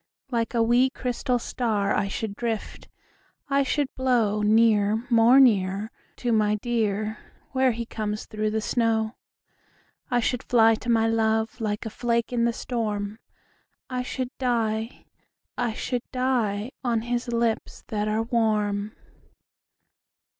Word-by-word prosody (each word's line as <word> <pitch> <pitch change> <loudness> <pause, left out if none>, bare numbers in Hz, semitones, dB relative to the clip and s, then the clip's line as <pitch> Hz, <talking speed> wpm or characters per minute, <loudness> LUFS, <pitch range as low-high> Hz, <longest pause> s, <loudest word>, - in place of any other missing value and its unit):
Like 230 0 -1
a 230 - +4
wee, 240 +3 +4
crystal 250 0 -1
star 220 -4 -1
I 200 - +1
should 200 +1 -4
drift, 225 -1 -4 0.6
I 280 0 +3
should 285 +2 +1
blow 235 -5 +1
Near, 215 0 +3
more 235 +3 +6
near, 205 -4 +3 0.2
To 245 - -2
my 210 -1 +3
dear 215 -1 -1 0.3
Where 260 -1 +3
he 235 0 -4
comes 215 -2 -4
through 215 0 -2
the 220 +1 -1
snow. 225 -1 0 1.0
I 245 - +2
should 245 +1 0
fly 225 -2 +4
to 235 +2 -5
my 225 -1 +3
love 225 +1 0
Like 210 0 -2
a 220 - -4
flake 235 +1 -1
in 235 -1 +2
the 235 - +2
storm, 215 -3 -3 0.7
I 250 0 -1
should 255 0 -4
die, 225 -3 -1 0.5
I 240 -2 -1
should 245 +2 -2
die, 245 -4 0
On 235 -3 +1
his 240 +1 -2
lips 235 -1 -1
that 210 -2 -1
are 215 +1 0
warm. 215 -3 0
225 Hz, 140 wpm, -25 LUFS, 215-245 Hz, 1.0 s, more